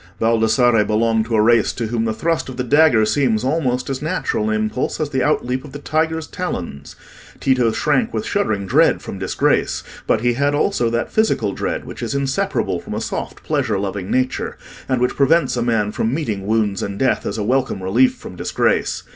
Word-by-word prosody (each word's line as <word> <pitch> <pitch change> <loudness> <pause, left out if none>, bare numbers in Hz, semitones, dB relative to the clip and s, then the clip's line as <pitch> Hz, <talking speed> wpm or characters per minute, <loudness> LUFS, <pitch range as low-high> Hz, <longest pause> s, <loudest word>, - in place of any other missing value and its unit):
Baldassarre 115 0 +3
belonged 110 +1 +1
to 115 0 -1
a 110 - +4
race 115 -1 +4
to 115 - -3
whom 115 0 -1
the 110 - 0
thrust 165 +5 -1
of 130 - -8
the 125 - -1
dagger 140 -4 +4
seems 110 0 +1
almost 130 -3 0
as 135 -1 -3
natural 155 -9 -1
an 110 - +1
impulse 110 +3 -2
as 150 -2 -2
the 130 - 0
outleap 130 -3 0
of 145 - -12
the - - -5
tiger's 160 +2 -1
talons. 85 - -5 0.4
Tito 125 -4 +2
shrank 220 - +1
with - - -3
shuddering 110 - -1
dread 95 - +3
from - - -7
disgrace; - - 0 0.2
but 110 - +2
he 120 0 +2
had 140 +3 +1
also 145 -6 +1
that 115 +1 -2
physical 220 - +1
dread - - -3
which - - -9
is - - -3
inseparable 140 - -1
from - - -7
a - - -1
soft - - -5
pleasure 105 -3 0
loving 95 -1 -4
nature, 130 0 -1 0.3
and 130 -2 +1
which 125 - +1
prevents 155 +3 +3
a 120 - -1
man 115 -3 +1
from 110 +2 -1
meeting 110 -10 -3
wounds 105 -3 +1
and 100 0 -4
death 130 +3 +1
as 100 - -3
a 105 - -1
welcome 125 -4 0
relief 120 +8 +3
from - - -10
disgrace. - - 0
120 Hz, 200 wpm, -20 LUFS, 110-140 Hz, 0.4 s, a